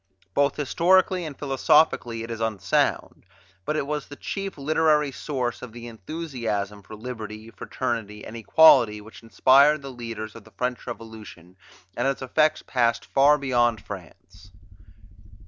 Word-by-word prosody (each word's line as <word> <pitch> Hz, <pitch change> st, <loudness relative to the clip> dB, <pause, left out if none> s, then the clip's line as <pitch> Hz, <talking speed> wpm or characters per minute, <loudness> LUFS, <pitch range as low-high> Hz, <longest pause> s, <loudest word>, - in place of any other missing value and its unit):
Both 140 Hz, 0 st, +2 dB
historically 180 Hz, +4 st, +2 dB
and 150 Hz, -3 st, -7 dB
philosophically 135 Hz, -4 st, +2 dB
it 115 Hz, -, -7 dB
is 115 Hz, 0 st, -5 dB
unsound; 110 Hz, -3 st, -1 dB, 0.4 s
but 150 Hz, -, -1 dB
it 155 Hz, -, -1 dB
was 150 Hz, 0 st, -4 dB
the 145 Hz, -, -10 dB
chief 195 Hz, +4 st, -5 dB
literary 150 Hz, 0 st, +2 dB
source 125 Hz, -4 st, -3 dB
of 125 Hz, -3 st, -9 dB
the 120 Hz, 0 st, -9 dB
enthusiasm 115 Hz, -, -5 dB
for 105 Hz, +2 st, -11 dB
liberty, 110 Hz, -1 st, -8 dB
fraternity, 115 Hz, -5 st, -4 dB
and 115 Hz, -, -9 dB
equality, 115 Hz, -3 st, +5 dB
which 110 Hz, +2 st, -13 dB
inspired 140 Hz, +5 st, +4 dB
the 135 Hz, -, -7 dB
leaders 115 Hz, -3 st, -7 dB
of 115 Hz, -, -12 dB
the 110 Hz, -, -19 dB
French 125 Hz, 0 st, -3 dB
Revolution, 110 Hz, -7 st, -10 dB, 0.4 s
and 120 Hz, +3 st, 0 dB
its 135 Hz, -1 st, -2 dB
effects 155 Hz, +4 st, +1 dB
passed 115 Hz, -2 st, 0 dB
far 145 Hz, +2 st, +4 dB
beyond 120 Hz, -5 st, +1 dB
France. 95 Hz, 0 st, -11 dB
120 Hz, 145 wpm, -24 LUFS, 110-145 Hz, 0.4 s, equality